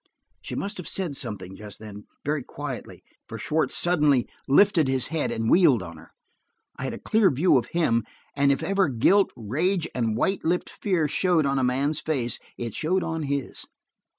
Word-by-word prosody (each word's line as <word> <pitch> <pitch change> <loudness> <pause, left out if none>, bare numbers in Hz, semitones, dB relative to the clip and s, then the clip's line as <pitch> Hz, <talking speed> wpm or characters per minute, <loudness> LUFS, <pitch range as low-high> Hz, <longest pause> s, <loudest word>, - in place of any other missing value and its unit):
She - - -6
must 205 +1 -3
have 180 - -7
said 175 -7 -1
something 95 -6 -4
just 105 -1 -10
then, 105 -1 -10 0.2
very 150 0 0
quietly, 140 0 -7 0.3
for - - -6
Schwartz 155 +1 0
suddenly 150 -8 +3 0.2
lifted 165 +1 +4
his 130 -1 +1
head 160 - 0
and 115 0 -2
wheeled 145 - +5
on 85 -1 -9
her. 80 - -15 0.7
I 130 - -5
had 130 - -3
a - - -7
clear 215 -3 +3
view 150 +5 +3
of 125 -2 +2
him, 115 -10 +1 0.3
and 140 0 +3
if 140 - -1
ever 195 -4 +2
guilt, 185 - +3
rage, 160 - 0
and 115 -3 -1
white 195 +10 0
lipped 175 +2 0
fear 180 -6 0
showed 170 0 +2
on 135 0 +1
a - - 0
man's 140 +4 +1
face, 125 -7 -2 0.2
it 115 -3 -4
showed 180 +4 0
on 160 0 -3
his. 140 -2 -3
145 Hz, 185 wpm, -25 LUFS, 120-175 Hz, 0.7 s, wheeled